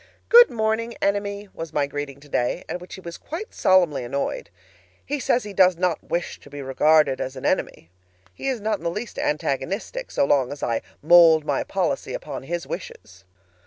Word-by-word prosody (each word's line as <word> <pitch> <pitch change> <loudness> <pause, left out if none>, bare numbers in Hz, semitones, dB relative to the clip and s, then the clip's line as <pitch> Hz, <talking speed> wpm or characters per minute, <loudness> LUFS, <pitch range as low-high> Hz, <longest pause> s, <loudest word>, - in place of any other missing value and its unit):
"Good 480 0 +9
morning, 225 +1 -1
Enemy!" 200 0 -1
was 165 -2 -7
my 145 -1 +2
greeting 140 -1 -6
today, 140 +1 -2
at 180 - -5
which 180 - -9
he 190 - -11
was 170 -2 -8
quite 355 +8 -7
solemnly 175 -8 +3
annoyed. 135 -4 -3 0.6
He 290 +1 -2
says 250 -1 +1
he 205 -1 -8
does 185 -2 +4
not 180 -2 0
wish 170 0 -3
to - - -16
be 145 0 -7
regarded 140 0 +3
as 130 +1 -4
an 130 - -7
enemy. 80 - -1 0.4
He - - -6
is 260 -3 0
not 215 +1 -1
in - - -14
the 170 - 0
least 210 +7 -6
antagonistic 165 - -2
so 280 - +1
long 135 - +2
as 145 - -7
I 115 -1 0 0.2
mold 165 -1 +7
my - - 0
policy - - -2
upon - - -6
his 170 +5 -4
wishes! 95 +2 -9
170 Hz, 190 wpm, -23 LUFS, 140-205 Hz, 0.6 s, Good